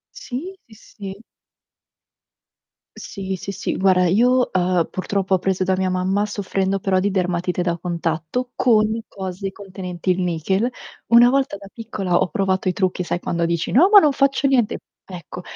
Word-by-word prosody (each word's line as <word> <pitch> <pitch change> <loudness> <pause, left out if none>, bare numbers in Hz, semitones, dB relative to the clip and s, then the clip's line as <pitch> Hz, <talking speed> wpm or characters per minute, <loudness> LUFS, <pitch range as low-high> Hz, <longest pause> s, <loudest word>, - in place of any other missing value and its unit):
Sì, 365 - -6
sì, 220 - -18
sì. 200 -1 -10 1.7
Sì, 195 -2 -6
sì, 190 +1 -6
sì, 195 0 -3
guarda 185 -1 +3
io, 245 +7 +3
uhm, 180 -2 +1
purtroppo 190 0 -1
ho - - +3
preso 190 0 0
da 190 - +1
mia 185 0 0
mamma, 190 +3 0
soffrendo 195 -1 -1
però 190 0 +1
di 200 +2 0
dermatite 180 -1 -1
da 175 -1 0
contatto 170 +7 -3
con 220 -2 +2
cose 190 0 -5
contenenti 185 -2 -5
il 180 0 +1
nichel. 180 +7 0 0.4
Una 235 +1 +7
volta 270 -5 +1
da 200 - -12
piccola 210 -5 -4
ho 180 - +2
provato 190 +2 0
i - - +2
trucchi, 185 0 -1
sai 175 - -2
quando 170 -1 -1
dici: 170 0 -2
"No, 325 +10 +6
ma 420 - +10
non 300 -7 +5
faccio 275 0 +2
niente." 255 -5 +2 0.3
Ecco, 180 -1 -9
190 Hz, 165 wpm, -21 LUFS, 180-220 Hz, 1.7 s, ma